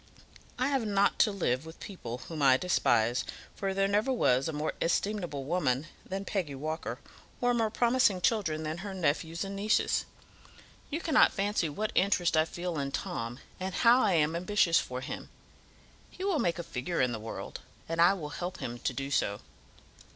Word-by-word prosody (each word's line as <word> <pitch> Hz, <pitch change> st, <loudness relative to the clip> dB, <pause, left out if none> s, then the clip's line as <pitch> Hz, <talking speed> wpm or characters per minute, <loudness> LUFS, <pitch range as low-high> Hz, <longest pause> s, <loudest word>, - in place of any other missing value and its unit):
I 255 Hz, +2 st, +1 dB
have 270 Hz, -4 st, +1 dB
not 200 Hz, -2 st, +2 dB
to 215 Hz, -, +5 dB
live 135 Hz, -10 st, 0 dB
with 160 Hz, +1 st, -11 dB
people 125 Hz, -, -7 dB
whom 160 Hz, -3 st, -5 dB
I 130 Hz, -2 st, +6 dB
despise, 120 Hz, -8 st, +2 dB, 0.3 s
for 195 Hz, -1 st, -2 dB
there 195 Hz, 0 st, +2 dB
never 210 Hz, +6 st, +1 dB
was 135 Hz, -, +2 dB
a -, -, -1 dB
more 150 Hz, 0 st, -2 dB
estimable 175 Hz, -5 st, -1 dB
woman 140 Hz, -3 st, 0 dB, 0.2 s
than 195 Hz, +1 st, -5 dB
Peggy 175 Hz, -10 st, -2 dB
Walker, 155 Hz, +4 st, -4 dB, 0.4 s
or 245 Hz, 0 st, +2 dB
more 225 Hz, -2 st, +1 dB
promising 240 Hz, -3 st, +3 dB
children 175 Hz, -6 st, +1 dB
than 155 Hz, +2 st, -3 dB
her 195 Hz, 0 st, -6 dB
nephews 165 Hz, 0 st, 0 dB
and 195 Hz, 0 st, -5 dB
nieces. 210 Hz, +2 st, +1 dB, 0.8 s
You 315 Hz, +3 st, -3 dB
cannot 320 Hz, -4 st, +4 dB
fancy 200 Hz, -4 st, 0 dB
what 210 Hz, +9 st, -2 dB
interest 180 Hz, -3 st, +2 dB
I 155 Hz, 0 st, +4 dB
feel 175 Hz, -1 st, -4 dB
in 140 Hz, -1 st, -2 dB
Tom, 115 Hz, -1 st, -4 dB, 0.2 s
and 185 Hz, 0 st, -3 dB
how 240 Hz, +2 st, +6 dB
I 195 Hz, -, +3 dB
am 160 Hz, 0 st, +2 dB
ambitious 175 Hz, -1 st, +3 dB
for 125 Hz, 0 st, -4 dB
him. -, -, -6 dB, 0.8 s
He 370 Hz, -, -8 dB
will 385 Hz, -6 st, +1 dB
make 170 Hz, -7 st, +1 dB
a 170 Hz, -, -4 dB
figure 165 Hz, +5 st, -3 dB
in 125 Hz, -1 st, +3 dB
the 115 Hz, -, -4 dB
world, 110 Hz, +1 st, -6 dB, 0.3 s
and 165 Hz, +1 st, 0 dB
I 175 Hz, +3 st, +7 dB
will 155 Hz, -6 st, -6 dB
help 175 Hz, +4 st, -5 dB
him 120 Hz, 0 st, -5 dB
to -, -, -1 dB
do 140 Hz, 0 st, -4 dB
so. 100 Hz, -6 st, 0 dB
175 Hz, 185 wpm, -30 LUFS, 145-205 Hz, 0.8 s, I